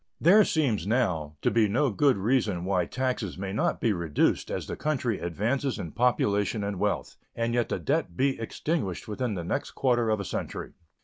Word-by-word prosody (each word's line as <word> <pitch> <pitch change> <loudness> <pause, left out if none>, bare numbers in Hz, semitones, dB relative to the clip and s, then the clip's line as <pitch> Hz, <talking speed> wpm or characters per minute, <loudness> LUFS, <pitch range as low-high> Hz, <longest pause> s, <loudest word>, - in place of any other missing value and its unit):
There 200 +7 +7
seems 130 - 0
now 90 - 0
to - - +3
be 115 -2 +4
no 125 +6 +1
good 135 +4 +3
reason 100 -4 +1
why 90 -3 +1
taxes 125 -8 -2
may 95 0 -4
not 110 - 0
be 115 - +2
reduced 85 -5 0
as - - -3
the - - -5
country 130 -8 -1
advances 115 - -1
in 85 - -5
population 105 -3 +1
and 100 -2 -3
wealth, - - -1 0.2
and 115 0 -1
yet 120 -1 +1
the - - -1
debt 135 - -1
be 135 -1 +1
extinguished 115 - -3
within 110 +1 -2
the 85 - -4
next 85 - -3
quarter 120 -3 +2
of 110 -1 +1
a 100 - -4
century. - - -5
110 Hz, 190 wpm, -27 LUFS, 95-130 Hz, 0.2 s, There